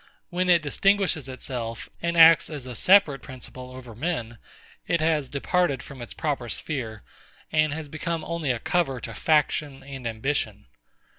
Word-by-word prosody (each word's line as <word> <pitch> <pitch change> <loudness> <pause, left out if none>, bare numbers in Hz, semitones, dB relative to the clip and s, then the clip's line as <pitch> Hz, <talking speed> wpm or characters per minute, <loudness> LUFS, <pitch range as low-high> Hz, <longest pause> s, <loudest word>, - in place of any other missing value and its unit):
When 180 +1 0
it 170 -3 +5
distinguishes 180 -2 +1
itself, 120 -3 -5
and 170 0 -1
acts 165 0 +8
as 145 -5 -6
a 125 - -6
separate 160 - +5
principle 130 -1 -9
over 130 -2 -10
men, 120 -4 -3 0.5
it 170 - +2
has 155 -4 +1
departed 140 -1 0
from 135 -2 -10
its 120 - -8
proper 140 -7 -2
sphere, 115 -9 -4 0.5
and 155 -1 +3
has 155 0 -5
become 155 +2 -3
only 170 -4 -3
a 125 - +2
cover 135 0 0
to - - -6
faction 150 -2 +1
and 135 -3 -6
ambition. 110 -2 -2
145 Hz, 155 wpm, -26 LUFS, 125-165 Hz, 0.5 s, acts